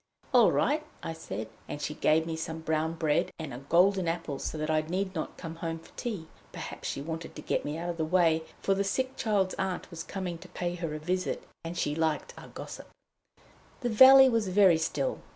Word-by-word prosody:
"All - - +7
right," 305 +2 +2 0.2
I 165 - -3
said. 110 -9 -6 0.2
And 145 - -4
she 150 - -3
gave 155 +1 +3
me 165 -1 -3
some 160 0 -5
brown 160 0 0
bread 155 -2 +1
and 155 -5 -6
a 120 - -6
golden 180 +6 +3
apple, 165 -4 -2
so - - -4
that 155 +1 -1
I 155 0 +3
need 185 +4 -2
not 160 - -4
come 165 -2 -7
home 165 -1 -3
for 165 - -16
tea. 210 -10 -4 0.3
Perhaps - - -6
she 140 - -4
wanted 165 +1 -6
to - - -7
get - - 0
me 150 +2 -3
out 175 +1 -2
of 170 - -8
the 160 - 0
way, 165 -1 +3 0.2
for 195 - +3
the 195 +1 +1
sick 260 +6 -1
child's 200 -5 +1
aunt 190 -1 -2
was 165 -1 -6
coming 180 -3 -4
to 185 - -12
pay 175 0 -3
her 165 -3 -4
a - - -2
visit, 180 +4 -2 0.2
and 165 +1 -5
she 145 - 0
liked 160 -1 -1
a - - -11
gossip. - - -9 0.9
The 245 - 0
valley 265 +4 +9
was 230 -5 +1
very 185 -3 +5
still. - - -1
165 Hz, 220 wpm, -29 LUFS, 160-190 Hz, 0.9 s, valley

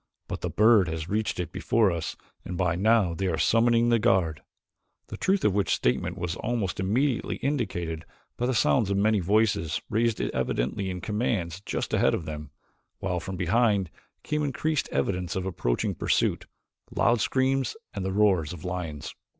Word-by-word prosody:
But - - -5
the - - -2
bird 105 -3 +5
has 80 0 -4
reached 105 -2 -1
it 90 - -3
before 110 -4 +2
us 85 -2 -3 0.3
and 90 - -5
by 90 -2 +1
now 105 -2 +3
they 95 +3 -2
are 85 -3 0
summoning 115 +6 +3
the 115 -1 +4
guard," 95 -9 +2 0.7
the - - -5
truth 195 +1 +1
of 105 - +4
which 100 0 +2
statement 60 - 0
was 90 0 -3
almost 110 -7 -2
immediately 120 +7 0
indicated 90 - -2 0.3
by 120 +2 0
sounds 115 -2 +3
of 100 - +1
many 105 +1 +3
voices 95 -4 +1
raised 115 0 +1
evidently 80 +11 -1
in 90 -1 -5
commands 95 -4 -2
just - - -3
ahead - - +3
of 80 - -5
them, 75 -2 -6 0.5
while 90 -2 -2
from 95 +2 -6
behind 100 0 +2 0.3
came 150 0 -1
increased 150 +2 -1
evidence 90 -3 -1
of 95 -1 -2
approaching - - -1
pursuit - - 0 0.4
loud 120 -2 +2
screams 135 - +1 0.2
and 100 - -4
the 95 - -1
roars 95 -6 +2
of 85 -1 -9
lions. 85 -5 -4
95 Hz, 165 wpm, -27 LUFS, 85-115 Hz, 0.7 s, bird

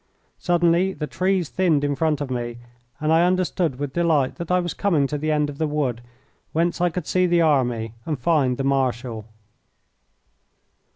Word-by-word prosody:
Suddenly 175 +1 +2
the 150 - -4
trees 180 +3 0
thinned 160 0 +1
in 145 0 +1
front 155 -1 0
of 140 -2 -4
me, 120 -1 -3 0.4
and 155 +1 +1
I 165 +1 +5
understood 180 -5 0
with 145 -1 -4
delight 160 -6 +1
that 170 -2 -6
I 180 0 +3
was 175 -1 -3
coming 170 -9 +1
to 150 +2 -2
the 155 +1 -1
end 150 -1 +1
of 145 -1 -8
the 160 - +1
wood, 140 -6 -1 0.5
whence 170 +2 0
I 175 - +3
could 175 -1 -5
see 185 0 +2
the 175 -1 +3
army 120 -8 +1
and 155 +1 -3
find 130 -2 +1
the 135 - -2
Marshal. 125 -5 -1
155 Hz, 180 wpm, -23 LUFS, 135-175 Hz, 0.5 s, I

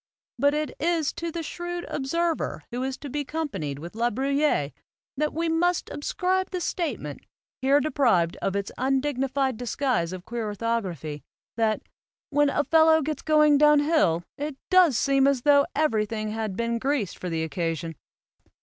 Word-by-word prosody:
But 285 +3 +3
it 305 0 -1
is 325 -3 +1
to 335 0 -4
the 330 0 -4
shrewd 350 +2 -5
observer 330 +4 -1
who 245 +1 -3
is 265 0 -2
to 290 - -8
be 290 +2 -3
companied 240 - -4
with 170 +4 -8
La 235 +2 +1
Bruyere 275 - +1 0.4
that 300 +2 0
we 330 +2 -1
must 340 +2 +1
ascribe 370 +5 -1
the 365 - -3
statement, 270 - -3 0.4
here 275 +2 +4
deprived 240 - +2
of 195 - -1
its 200 0 -2
undignified 265 -1 0
disguise 245 -7 -1
of 185 -1 -7
queer 235 -1 -4
orthography, 195 - -3 0.3
that 220 -2 0 0.5
"when 290 0 +3
a 290 - +1
fellow 320 0 +5
gets 305 +1 -3
going 300 -2 +4
down 300 -1 +6
hill, 290 - +2 0.2
it 295 0 -3 0.2
does 360 -9 +6
seem 275 -1 +3
as 275 -3 +1
tho 285 -1 +5
everything 215 -7 0
had 215 -3 -3
been 235 0 -1
greased 265 -7 -1
for 180 - -4
the 165 -1 -1
occasion." 165 0 -3
270 Hz, 160 wpm, -26 LUFS, 215-305 Hz, 0.5 s, down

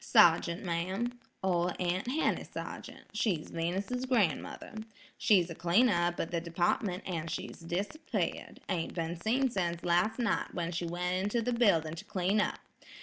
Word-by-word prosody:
"Sergeant, 170 +2 +5
ma'am, 190 +8 -2 0.2
Ol' 180 -1 +2
Aunt 180 +4 0
Henny 290 +6 +1
Sargeant, - - -7
she's 200 -7 0
Venus's 195 +10 -2
gran'mother. 205 - 0 0.4
She's 195 -8 +4
a - - -3
cleaner 175 +10 +4
up 175 0 +1
at 165 - -2
the 170 -1 0
department, 180 +3 0
an' 165 -3 -2
she's - - -5
disappeared; 195 - -3
ain't 170 -3 -2
been 165 0 -2
seen 255 +6 +2
sense 170 -4 -1
last 175 +6 +2
night, 235 -3 0
when 170 -1 -1
she 175 0 -2
went 180 +2 -1
into 205 +4 0
the 245 +2 0
building 170 -10 +3
to 165 - -8
clean 195 +3 +1
up. - - -1
180 Hz, 155 wpm, -32 LUFS, 170-215 Hz, 0.4 s, Sergeant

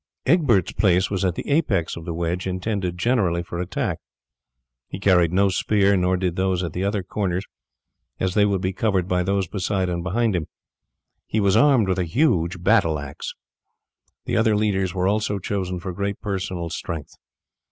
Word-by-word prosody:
Egbert's 130 - +3
place 95 -2 +2
was 95 -2 -1
at 90 -2 +1
the - - -6
apex 120 - +1
of 85 - -8
the 85 - -3
wedge 85 +2 -2
intended 95 -1 -2
generally 95 -5 +1
for 85 0 -6
attack. 90 +1 -2 0.9
He - - -7
carried 90 -4 +4
no 100 +2 +3
spear, 100 +1 +2
nor 90 0 +2
did 90 -2 -1
those 95 -1 0
at 85 - -4
the 90 - -2
other 100 -1 -1
corners, 95 0 -2 0.7
as 95 -1 0
they 105 - +4
would 100 -2 +1
be 95 +1 -1
covered 95 -3 0
by 90 -1 +1
those 95 0 0
beside 95 0 -1
and 85 -1 -2
behind 110 +5 0
them; 85 -4 -2 0.8
he 110 - 0
was 100 -1 +3
armed 130 -4 +5
with 95 -1 0
a - - +2
huge 90 - +1
battle 90 -6 +3
axe. 70 -1 -7 0.9
The - - 0
other 110 -1 +3
leaders 100 -3 +1
were 90 0 +1
also 105 0 0
chosen 95 -2 -3
for 90 +1 -5
great 100 +2 -3
personal 95 -5 -3
strength. 80 -3 -5
95 Hz, 180 wpm, -23 LUFS, 90-100 Hz, 0.9 s, armed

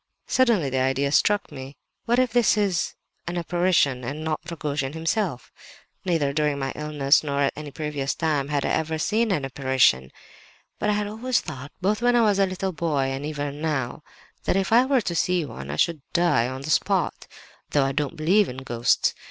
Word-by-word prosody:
Suddenly 225 - +2
the 130 - 0
idea 135 +2 +1
struck 205 +5 +2
me—what 140 - -5
if 255 -2 +2
this 235 -4 +4
is 195 -5 0 0.3
an 175 +1 -3
apparition 175 -7 +1
and 145 +6 -5
not 155 -1 -1
Rogojin 145 -4 -3
himself? 165 - -2 0.5
"Neither 160 -6 +1
during 150 -1 +1
my 135 -1 -2
illness 150 -1 +2
nor 140 -1 -1
at 140 - +2
any 150 0 -7
previous 145 -2 -3
time 150 -4 0
had 145 -1 -1
I - - 0
ever 160 0 0
seen 220 +8 +1
an 150 -8 0
apparition;—but 130 - -1
I - - +3
had 205 0 0
always 230 +4 0
thought, 140 -3 -8
both 210 +4 +1
when 245 0 +3
I 240 - +5
was 205 -3 +3
a 195 - +4
little 185 +1 -3
boy, 150 -5 0
and 135 +1 -4
even 145 -1 -4
now, 145 -5 -2 0.4
that - - +1
if 195 +3 0
I 245 +2 +6
were 270 -2 +3
to 180 - -3
see 175 0 +1
one 70 - -8
I 75 - -3
should 160 - +1
die 170 -9 +3
on 130 +1 -6
the 155 - -3
spot—though 145 -2 -1
I 135 - 0
don't 145 0 -2
believe 185 +6 +3
in 125 - -7
ghosts. 120 -3 +1
150 Hz, 190 wpm, -24 LUFS, 135-185 Hz, 0.5 s, I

